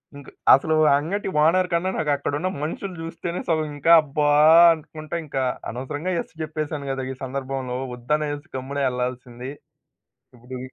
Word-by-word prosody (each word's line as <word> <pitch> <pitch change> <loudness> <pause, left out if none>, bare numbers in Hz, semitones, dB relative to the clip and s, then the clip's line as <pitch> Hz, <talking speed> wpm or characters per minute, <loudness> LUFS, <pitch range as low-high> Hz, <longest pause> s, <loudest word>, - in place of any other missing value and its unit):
ఇంక 140 - -11 0.3
అసలు 155 +4 +3 0.2
అంగటి 190 +9 -3 0.2
ఓనర్ 180 +3 +3
కన్నా 170 +2 +1
నాకక్కడున్న 145 +3 -1
మనుషులు 185 +4 -4
జూస్తేనే 170 +1 -5
సగం 155 -2 +1
ఇంకా 165 +4 +2
అబ్బా! 150 0 0 0.4
అనుకుంట 155 0 -10
ఇంక 135 - -6 0.3
అనవసరంగా 145 +9 -4
ఎస్ - - -14
చెప్పేసాను 155 -2 -4
గదా! 135 -1 -3
ఈ - - -6
సందర్భంలో 130 -1 -4 0.2
వద్దనేసి 145 +5 -2
గమ్మున 140 +2 -4
ఏళ్ళాల్సింది. 125 0 -5 0.8
ఇపుడు 125 +2 -9
145 Hz, 130 wpm, -23 LUFS, 130-160 Hz, 0.8 s, అసలు